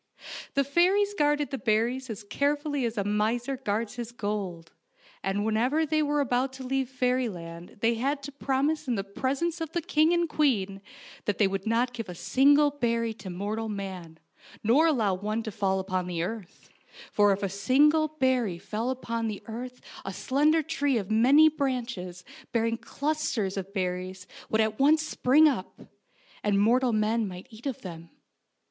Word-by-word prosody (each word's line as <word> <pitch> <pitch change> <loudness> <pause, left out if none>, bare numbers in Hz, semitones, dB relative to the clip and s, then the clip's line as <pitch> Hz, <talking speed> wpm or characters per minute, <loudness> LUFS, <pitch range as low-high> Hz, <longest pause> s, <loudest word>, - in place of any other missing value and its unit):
The 280 - +4
fairies 370 +8 +3
guarded 295 -5 +1
the 270 - -3
berries 240 +3 0
as 215 -1 -6
carefully 290 +4 0
as 230 -1 -3
a 200 - +1
miser 220 +6 0
guards 230 -2 -3
his 240 -1 -5
gold, 200 -8 -4 0.5
and 195 +2 -1
whenever 250 +9 +2
they 310 0 +1
were 295 0 +1
about 255 0 0
to 265 0 -8
leave 265 0 -1
fairyland 225 -10 -2
they 230 +1 +3
had 275 +5 -1
to 285 - -6
promise 285 +2 -1
in 245 - +1
the 195 - -2
presence 275 - -2
of 325 -1 -4
the 345 - 0
king 310 +2 +3
and 345 -1 +2
queen 200 -12 0 0.4
that 205 - 0
they 210 - +4
would 195 +1 -3
not 240 +2 +1
give 230 -5 -6
a 180 - -6
single 285 - +4
berry 230 -4 0
to 195 -3 -9
mortal 210 +5 -3
man, 190 -5 -6 0.5
nor 265 +10 +5
allow 225 -11 +2
one 210 +4 -2
to 220 - -5
fall 190 -1 0
upon 185 -1 -2
the 170 -2 -2
earth; 200 -1 -7 0.4
for 205 -1 +4
if 195 +1 -1
a - - +2
single 285 - +3
berry 260 - 0
fell 215 +6 -3
upon 230 -3 -2
the 210 -2 -5
earth 245 +3 -7 0.2
a 195 - -4
slender 300 - +2
tree 285 -3 0
of 200 -2 -4
many 265 +8 +6
branches, 240 - -2 0.3
bearing 230 0 +1
clusters 280 -10 -2
of 195 0 -5
berries, 185 -1 -3 0.2
would 220 - +2
at 220 0 -1
once 310 +3 +4
spring 305 +1 +4
up, 240 -11 -2 0.6
and 205 -1 +2
mortal 245 +4 +3
men 215 0 +1
might 180 -1 -8
eat 225 +5 -8
of 265 - -4
them. 170 -3 -8
230 Hz, 175 wpm, -28 LUFS, 200-280 Hz, 0.6 s, many